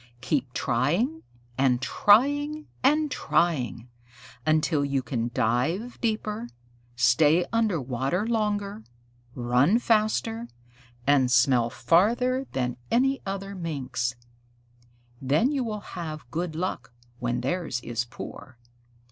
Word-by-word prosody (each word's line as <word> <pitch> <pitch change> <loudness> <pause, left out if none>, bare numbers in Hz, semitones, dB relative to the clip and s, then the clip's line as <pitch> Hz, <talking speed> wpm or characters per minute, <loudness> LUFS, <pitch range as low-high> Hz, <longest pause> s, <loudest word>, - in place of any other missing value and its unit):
"Keep 130 -2 -1
trying 175 - 0 0.4
and 130 -2 +3
trying 290 - +3 0.2
and 300 +2 +3
trying, 130 - 0 0.6
until 155 -1 +2
you 140 -2 0
can 120 -1 -2
dive 160 - 0
deeper, 220 0 -2 0.5
stay 145 +8 +4
under 220 -7 +2
water 135 - -1
longer, 210 -2 -1 0.5
run 125 - +3
faster, 225 0 +1 0.6
and 135 -3 +3
smell 125 -2 +4
farther 240 - +2
than 125 -2 -1 0.5
other 195 0 -4
Minks. 130 -9 -3 1.1
Then 150 - +2
you 275 -3 0
will 215 -3 -4
have 155 -6 -6
good 165 +2 -3
luck 155 -9 -4 0.3
when 120 0 -1
theirs 155 -2 -2
is 120 -1 -2
poor. 125 +1 -10
160 Hz, 105 wpm, -26 LUFS, -, 1.1 s, stay